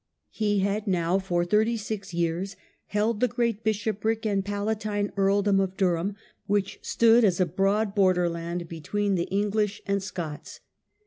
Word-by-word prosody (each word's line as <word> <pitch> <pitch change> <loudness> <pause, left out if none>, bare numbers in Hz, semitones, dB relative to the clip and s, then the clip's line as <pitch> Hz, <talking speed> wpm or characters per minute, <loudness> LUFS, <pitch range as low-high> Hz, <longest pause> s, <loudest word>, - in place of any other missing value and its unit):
He 205 -2 0
had 200 +2 -1
now 180 0 +1
for 175 -2 0
thirty 220 +5 +2
six 205 -2 -5
years 170 +3 -1 0.3
held 210 +1 0
the 250 - +3
great 235 -2 -1
bishopric 220 +1 -1
and 200 -2 +1
palatine 205 0 -2
earldom 200 0 +3
of 190 -1 -1
Durham, 185 +1 +1 0.3
which 205 -1 0
stood 230 +1 +4
as 190 -4 +3
a 185 - +4
broad 195 +4 +1
borderland 175 -3 +1
between 200 +5 -2
the 175 -2 0
English 205 +1 0
and 200 0 0
Scots. 170 -6 -6
200 Hz, 145 wpm, -26 LUFS, 185-210 Hz, 0.3 s, stood